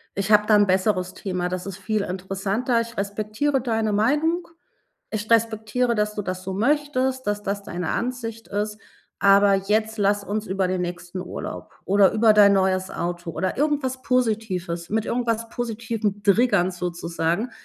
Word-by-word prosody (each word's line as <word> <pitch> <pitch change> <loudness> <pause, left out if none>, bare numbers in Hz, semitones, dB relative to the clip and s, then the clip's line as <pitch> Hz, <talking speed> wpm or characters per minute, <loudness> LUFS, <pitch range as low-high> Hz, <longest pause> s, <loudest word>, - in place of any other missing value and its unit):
ich 195 +2 -1
habe 210 0 +5
da 215 - +6
'n 205 0 +5
besseres 185 -1 +1
Thema, 180 -2 -3
das 180 +1 -4
ist 195 -2 -6
viel 205 +2 -1
interessanter. 195 +6 -1
Ich 230 0 -8
respektiere 215 +7 -1
deine 225 -3 0
Meinung. 300 +11 +1 0.6
Ich 215 0 -5
respektiere, 230 +2 +2
dass 210 -1 0
du 210 - -3
das 185 -1 -4
so 190 - -4
möchtest, 260 +3 0
dass 205 0 -1
das 200 0 -3
deine 175 -3 -4
Ansicht 230 -2 -3
ist, 210 +1 -3 0.4
aber 200 0 +5
jetzt 215 +3 0
lass 205 0 +2
uns 210 +2 -3
über 190 -1 0
den 185 -1 -1
nächsten 175 +1 -5
Urlaub - - -7
oder 200 0 +5
über 220 0 +5
dein 205 -1 +7
neues 190 -1 +1
Auto 175 0 -4
oder 185 +3 -2
irgendwas 280 -3 0
Positives“ 205 -8 -1
mit 220 +1 0
irgendwas 230 -1 -1
positivem 225 -3 -3
Triggern 205 -3 +3
sozusagen, 175 +3 -2
210 Hz, 160 wpm, -23 LUFS, 190-230 Hz, 0.6 s, dein